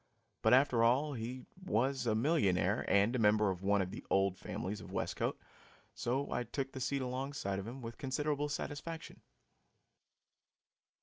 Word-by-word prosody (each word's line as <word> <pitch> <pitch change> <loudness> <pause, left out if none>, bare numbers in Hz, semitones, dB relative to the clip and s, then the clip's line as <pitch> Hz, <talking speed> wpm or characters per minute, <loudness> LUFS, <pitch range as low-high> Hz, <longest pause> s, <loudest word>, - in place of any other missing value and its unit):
But, 110 +3 +6
after 130 -3 +4
all, 135 +6 +3
he 125 +1 -5 0.2
was 130 - 0
a 110 - +3
millionaire 105 - +2
and 100 +5 +3
a - - +1
member 105 -1 +4
of 90 -1 -5
one 100 0 +3
of 90 - -6
the - - -7
"old 95 -1 +3
families" 95 +2 -5
of - - -10
Westcote, - - -1 0.6
so 135 +4 -1
I - - 0
took 135 +3 -4
the 130 - -6
seat 140 +1 0
alongside 130 -6 -3
of 100 - -6
him 125 +2 -7
with 115 +1 -7
considerable 145 +2 -1
satisfaction. 160 +3 -5
120 Hz, 160 wpm, -34 LUFS, 105-140 Hz, 0.6 s, But